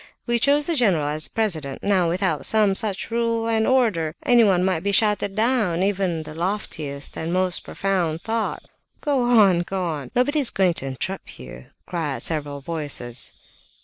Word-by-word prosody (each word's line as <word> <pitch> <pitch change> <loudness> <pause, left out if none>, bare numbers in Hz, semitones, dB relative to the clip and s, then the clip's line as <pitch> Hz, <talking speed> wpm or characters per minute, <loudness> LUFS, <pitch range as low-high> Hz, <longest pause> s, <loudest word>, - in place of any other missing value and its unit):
We 240 -1 +1
chose 285 +4 +3
the 340 - 0
general 195 - +2
as 155 +1 +1
president. 160 - -2
Now 190 -4 +2
without 185 +3 -1
some 215 -3 +3
such 205 +2 -1
rule 230 -1 0
and 220 -1 +1
order, 210 -12 +1
anyone 205 -7 +4
might 185 -3 +1
be 200 +2 -1
shouted 205 -1 +2
down, 215 -6 +1
even 195 -1 +1
in 165 -2 -3
the 155 0 -9
loftiest 160 -5 -4
and 160 +1 -4
most 185 0 +1
profound 175 -5 -1
thought...." 225 0 -2 0.4
"Go 285 -4 +1
on! 210 -7 +5
Go 185 +2 -3
on! 150 -7 -4
Nobody 290 +5 +2
is 275 - +3
going 185 -3 +2
to 135 - -5
interrupt 170 +9 -5
you!" 65 -1 -10 0.2
cried 150 -8 -3
several 145 -3 -3
voices. 140 -6 -3
190 Hz, 170 wpm, -23 LUFS, 160-220 Hz, 0.4 s, on